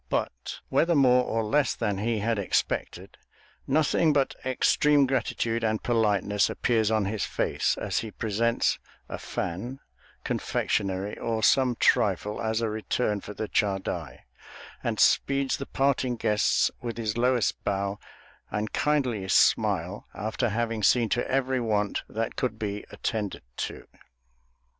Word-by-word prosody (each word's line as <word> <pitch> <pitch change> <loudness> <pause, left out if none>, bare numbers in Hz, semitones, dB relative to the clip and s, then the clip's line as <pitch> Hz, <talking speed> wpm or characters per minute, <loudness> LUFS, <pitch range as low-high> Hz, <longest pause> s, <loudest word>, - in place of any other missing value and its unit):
But, - - -3
whether 170 +1 +3
more 125 -3 +5
or 115 0 -1
less 140 +6 +1
than 105 -4 -1
he 115 +2 0
had 110 +1 0
expected, 100 - -2 0.5
nothing 155 +2 +3
but 140 -2 +1
extreme 140 +2 +3
gratitude 120 -3 -1
and 110 -1 0
politeness 105 -3 +2
appears 110 -3 +1
on 110 -2 +1
his 105 +2 -2
face - - 0
as - - -1
he 110 - -5
presents 115 +3 0 0.3
a - - -6
fan, 120 +10 -4 0.4
confectionery, 95 +1 -1
or 110 -1 -2
some 130 -2 +4
trifle, 105 -1 +2
as 110 +1 0
a 115 - 0
return 110 -1 -1
for 105 - -9
the 110 - -3
chadai, 95 - -2 0.6
and - - -2
speeds 140 -1 +3
the 140 - -6
parting 135 -2 +1
guests 105 -3 +2
with 115 -2 -5
his 110 -2 -2
lowest 120 -2 +1
bow 100 +1 -1 0.5
and 105 +1 -3
kindliest 125 -10 +1
smile, - - +2
after 110 +3 -1
having 115 0 -1
seen 115 +2 +3
to 120 - 0
every 130 0 +1
want 105 -3 0
that 115 +1 -3
could 120 -4 -2
be 105 -1 -4
attended 105 -3 -3
to. - - -5
115 Hz, 140 wpm, -27 LUFS, 105-125 Hz, 0.6 s, more